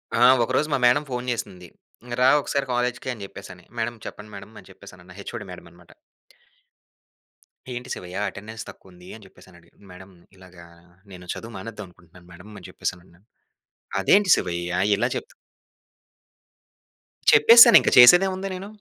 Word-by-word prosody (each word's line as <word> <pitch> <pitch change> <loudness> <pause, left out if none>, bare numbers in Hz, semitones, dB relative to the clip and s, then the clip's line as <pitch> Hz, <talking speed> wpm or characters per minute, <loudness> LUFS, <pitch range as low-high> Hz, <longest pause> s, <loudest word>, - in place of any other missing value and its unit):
ఆ! 120 - +4 0.2
ఒకరోజు 130 +5 -1
మా - - +2
మేడమ్ 125 +5 +2
ఫోన్ 125 0 -5
జేసింది, 95 -6 -7 0.4
"ఇంగ 120 - -9
రా 130 - +5
ఒకసారి 140 0 -3
కాలేజ్‌కి." 125 +1 -3
అని 105 -4 -11
జెప్పేసని. 95 -2 -13
"మేడమ్, 120 +1 -4
చెప్పండి 105 0 -11
మేడమ్." 100 +3 -13
అని - - -18
చెప్పేసనన్నా. 90 -1 -16
హెచ్ఓడి 100 +1 -8
మేడమ్ 90 -1 -12
అన్నమాట. 85 0 -21 1.8
"ఏంటి 125 +1 -8
శివయ్య, 90 +1 -9
అటెండన్స్ 110 +2 -10
తక్కువుంది?" 90 -1 -17
అని 110 - -15
జెప్పేసని 95 -1 -19
అడిగింది. 85 +4 -26
"మేడమ్, 95 +1 -15 0.2
ఇలాగా 90 -2 -16 0.5
నేను 90 -1 -13
చదువు 115 +1 -10
మానేద్దాం 105 0 -9
అనుకుంటున్నాను 90 0 -21
మేడమ్." 90 +5 -15
అని 95 - -13
జెప్పేసనన్నా. 90 -1 -8 0.8
"అదేంటి 200 -2 +3
శివయ్య? 85 -1 -4 0.3
ఇలా - - -1
చెప్త్" - - -7 2.0
చెప్పేసానింక. 230 - +7
చేసేదేముంది 185 +9 +5
నేను? 190 +2 -9
105 Hz, 135 wpm, -22 LUFS, 90-125 Hz, 2.0 s, చెప్పేసానింక